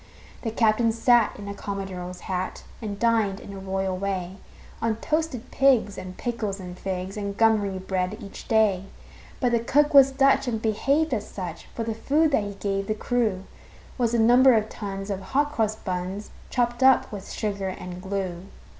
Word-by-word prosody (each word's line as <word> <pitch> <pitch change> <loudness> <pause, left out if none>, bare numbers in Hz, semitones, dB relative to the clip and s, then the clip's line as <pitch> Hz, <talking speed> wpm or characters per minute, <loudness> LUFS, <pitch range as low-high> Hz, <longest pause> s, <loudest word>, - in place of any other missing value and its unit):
The 230 - -2
captain 225 0 +3
sat 235 0 +3
in 200 - -8
a 200 - -4
commodore's 190 -3 -6
hat 185 0 -3 0.2
And 205 -3 -4
dined, 220 -3 +2
in 200 - -10
a 195 - -7
royal 190 0 -2
way, 190 -1 -3 0.4
On 225 -1 +1
toasted 300 -1 -2
pigs 255 -7 +3
and 185 -1 -8
pickles 220 -5 -3
and 180 -1 -7
figs 190 +1 -4
And 200 -1 -4
gummery 210 -4 +3
bread, 185 +1 -2
each 200 -4 -10
day. 210 -4 +3 0.5
But 250 -2 +2
the 235 - +3
cook 295 +6 +2
was 275 -1 +9
Dutch, 270 0 +3
and 225 -3 -1
behaved 275 +8 +1
as 210 -3 -2
such; 175 -4 -7
For 230 - -2
the 225 0 -2
food 295 +8 +2
that 225 - +2
he 200 -1 -6
gave 195 0 -2
the 215 - 0
crew 215 -5 0 0.6
Was 235 -1 +2
a - - +3
number 245 +3 +6
of 215 0 +1
tons 195 -1 -5
of 195 -1 -3
hot 285 +9 0
cross 220 -6 0
buns, 185 +1 -4 0.2
Chopped 240 -1 0
up 265 0 +5
with 200 -3 -7
sugar 200 -2 -2
and 180 -1 -7
glue. 190 -2 -4
210 Hz, 180 wpm, -25 LUFS, 195-235 Hz, 0.6 s, was